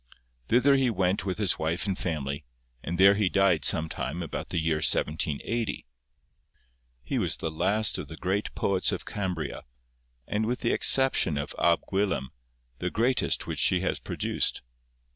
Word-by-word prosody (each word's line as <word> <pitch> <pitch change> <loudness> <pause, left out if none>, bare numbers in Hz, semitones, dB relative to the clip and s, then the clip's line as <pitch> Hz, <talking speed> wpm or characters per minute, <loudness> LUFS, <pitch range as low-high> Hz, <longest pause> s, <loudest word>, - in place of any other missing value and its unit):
Thither 135 +4 +4
he 130 -2 +2
went 95 -2 0
with 95 - -2
his 105 -4 0
wife 80 +4 -1
and 100 -2 -1
family, 75 -5 -4 0.4
and 85 +5 -4
there 100 +2 +7
he 100 -2 +1
died 95 -6 +2
some 80 - +3
time 80 +2 -4
about 80 - -6
the - - -3
year 80 -1 +1
1780. 80 +9 -1 1.2
'He - - -2
was - - -1
the 80 - -4
last 105 +7 +3
of - - -6
the 80 - -10
great 95 +3 -2
poets 95 -2 0
of - - -5
Cambria, 90 -7 -4 0.6
and 110 +1 -1
with 125 +2 -2
the 115 - +1
exception 130 - +3
of 70 +1 -4
Ab 85 -1 +3
Gwilym, 95 -9 -1 0.5
the 90 - -2
greatest 120 +7 0
which - - -4
she - - +3
has - - -1
produced. - - 0
95 Hz, 160 wpm, -27 LUFS, 80-105 Hz, 1.2 s, there